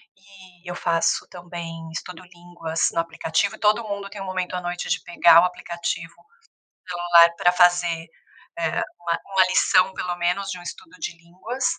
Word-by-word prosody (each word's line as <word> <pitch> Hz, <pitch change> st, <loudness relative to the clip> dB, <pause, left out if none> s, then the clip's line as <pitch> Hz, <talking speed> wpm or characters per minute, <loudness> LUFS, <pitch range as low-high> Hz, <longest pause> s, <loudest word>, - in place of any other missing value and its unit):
e 190 Hz, -2 st, -16 dB
eu 175 Hz, -, -4 dB
faço 165 Hz, -1 st, +1 dB
também 170 Hz, -2 st, -8 dB
estudo 165 Hz, +1 st, -7 dB
línguas 175 Hz, -2 st, -3 dB
no -, -, 0 dB
aplicativo 165 Hz, +4 st, -1 dB
e -, -, -20 dB
todo 215 Hz, +2 st, +3 dB
mundo 200 Hz, -2 st, -5 dB
tem 205 Hz, 0 st, -9 dB
um -, -, -5 dB
momento 185 Hz, -1 st, -3 dB
à 180 Hz, -, -3 dB
noite 175 Hz, 0 st, -4 dB
de -, -, 0 dB
pegar 170 Hz, -1 st, +6 dB
o 180 Hz, -, +3 dB
aplicativo 170 Hz, -1 st, -4 dB
no 465 Hz, +2 st, -28 dB, 0.5 s
celular 175 Hz, -1 st, +5 dB
pra 180 Hz, -, +4 dB
fazer, 175 Hz, -2 st, +3 dB, 0.5 s
eh, 165 Hz, -1 st, 0 dB, 0.2 s
uma 170 Hz, -1 st, -2 dB
uma 190 Hz, -1 st, +3 dB
lição 185 Hz, 0 st, +3 dB
pelo 180 Hz, -1 st, -3 dB
menos, 180 Hz, +3 st, -1 dB
de 180 Hz, -, -6 dB
um -, -, -12 dB
estudo 325 Hz, -, -10 dB
de 175 Hz, -, -5 dB
línguas 185 Hz, +10 st, -6 dB
175 Hz, 180 wpm, -23 LUFS, 170-190 Hz, 0.5 s, pegar